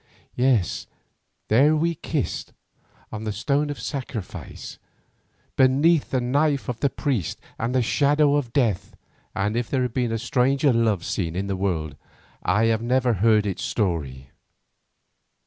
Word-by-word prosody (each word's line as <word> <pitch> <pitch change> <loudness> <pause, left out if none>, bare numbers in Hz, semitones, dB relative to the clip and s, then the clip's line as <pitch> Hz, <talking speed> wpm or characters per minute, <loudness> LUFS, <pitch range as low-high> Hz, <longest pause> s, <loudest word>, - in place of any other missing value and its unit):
Yes, 125 -8 +1 0.6
there 140 +8 +4
we 165 +2 +1
kissed, - - -3 0.6
on 110 0 -5
the 110 - -2
stone 140 +8 0
of 145 - -5
sacrifice, 130 - -6 0.8
beneath 140 +5 +4
the 130 - +1
knife 140 +3 +1
of 120 -2 -4
the 140 - +2
priest 125 - -2 0.2
and 120 +3 -1
the 130 - +3
shadow 145 +4 +3
of 145 -5 0
death, 115 -10 0 0.4
and 105 +3 0
if 120 -1 -1
there 130 -2 +1
has 125 - -2
been 120 -1 -1
a 115 - 0
stranger 130 +3 +2
love 110 -6 +1
scene 85 -4 -2
in 95 +2 -2
the 100 -1 -2
world, 85 -7 -2 0.5
I 105 +6 +2
have 115 -1 +2
never 125 +1 +2
heard 105 +1 +3
its 100 -3 -3
story. 70 - -2
120 Hz, 145 wpm, -24 LUFS, 105-140 Hz, 0.8 s, there